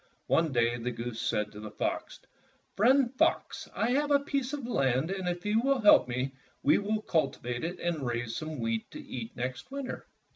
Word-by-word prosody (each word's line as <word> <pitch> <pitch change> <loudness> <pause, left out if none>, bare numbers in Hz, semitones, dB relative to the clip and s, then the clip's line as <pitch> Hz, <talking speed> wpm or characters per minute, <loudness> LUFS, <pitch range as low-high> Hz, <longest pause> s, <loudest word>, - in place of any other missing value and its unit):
One 165 -2 +2
day 120 -1 +2
the 120 +2 -2
goose 115 -1 -5
said 105 -2 0
to 105 - -10
the 105 0 -7
fox, - - -3 0.6
''Friend 250 +4 +4
Fox, 325 - +1
I 235 - +1
have 290 +3 +2
a 285 - +6
piece 275 -2 -2
of 290 -4 -4
land, 135 - +1
and 190 -2 -2
if 175 +1 -4
you 215 +2 +3
will 270 0 +2
help 210 -10 +7
me, 130 +2 -2 0.3
we 145 - +5
will 210 +1 -1
cultivate 125 -6 -1
it 175 +2 -3
and 170 -4 -1
raise 120 -2 -2
some 155 -1 -4
wheat 115 -1 -1
to - - -9
eat 120 -2 -7
next 125 - -4
winter." 275 -1 -5
160 Hz, 195 wpm, -30 LUFS, -, 0.6 s, help